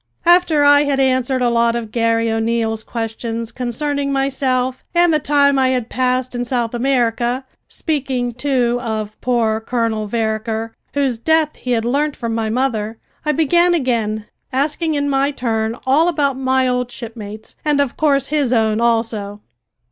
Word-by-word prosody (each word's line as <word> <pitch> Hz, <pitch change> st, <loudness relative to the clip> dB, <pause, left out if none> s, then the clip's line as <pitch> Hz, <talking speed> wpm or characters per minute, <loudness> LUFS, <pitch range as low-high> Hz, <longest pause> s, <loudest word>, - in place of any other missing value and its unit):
After 345 Hz, -4 st, +4 dB
I 290 Hz, 0 st, +6 dB
had 280 Hz, -1 st, 0 dB
answered 260 Hz, -1 st, +1 dB
a 240 Hz, -, +3 dB
lot 235 Hz, 0 st, +2 dB
of 230 Hz, -2 st, -4 dB
Garry 230 Hz, -1 st, +1 dB
O'Neil's 225 Hz, 0 st, 0 dB
questions 230 Hz, 0 st, -4 dB
concerning 280 Hz, +4 st, -2 dB
myself 260 Hz, -2 st, 0 dB
and 345 Hz, -1 st, +4 dB
the 305 Hz, -, +3 dB
time 280 Hz, -1 st, +3 dB
I 260 Hz, -, +3 dB
had 250 Hz, -3 st, -1 dB
passed 255 Hz, 0 st, 0 dB
in 245 Hz, 0 st, -2 dB
South 240 Hz, -2 st, -1 dB
America, 245 Hz, 0 st, 0 dB, 0.2 s
speaking, 265 Hz, -6 st, -2 dB
too, 250 Hz, -1 st, 0 dB
of 215 Hz, -3 st, -4 dB
poor 230 Hz, -3 st, +1 dB
Colonel 225 Hz, -2 st, -1 dB
Vereker, 220 Hz, 0 st, -2 dB, 0.2 s
whose 270 Hz, -5 st, 0 dB
death 315 Hz, +3 st, +2 dB
he 250 Hz, -, -3 dB
had 225 Hz, -1 st, 0 dB
learnt 285 Hz, +4 st, 0 dB
from 230 Hz, -1 st, -3 dB
my 225 Hz, -1 st, -1 dB
mother, 225 Hz, -3 st, -1 dB, 0.3 s
I -, -, +4 dB
began 345 Hz, +3 st, +3 dB
again, 225 Hz, -7 st, -1 dB, 0.3 s
asking 300 Hz, +4 st, 0 dB
in 285 Hz, 0 st, 0 dB
my 275 Hz, 0 st, +2 dB
turn 225 Hz, -4 st, -2 dB
all 290 Hz, +6 st, +4 dB
about 285 Hz, -5 st, +1 dB
my 260 Hz, 0 st, +1 dB
old 250 Hz, -1 st, 0 dB
shipmates, 220 Hz, -3 st, -9 dB
and, 295 Hz, -2 st, +1 dB
of 280 Hz, -3 st, 0 dB
course, 280 Hz, -3 st, +1 dB
his 290 Hz, -4 st, +1 dB
own 220 Hz, -2 st, +2 dB
also. 225 Hz, -3 st, 0 dB
250 Hz, 160 wpm, -18 LUFS, 230-275 Hz, 0.3 s, I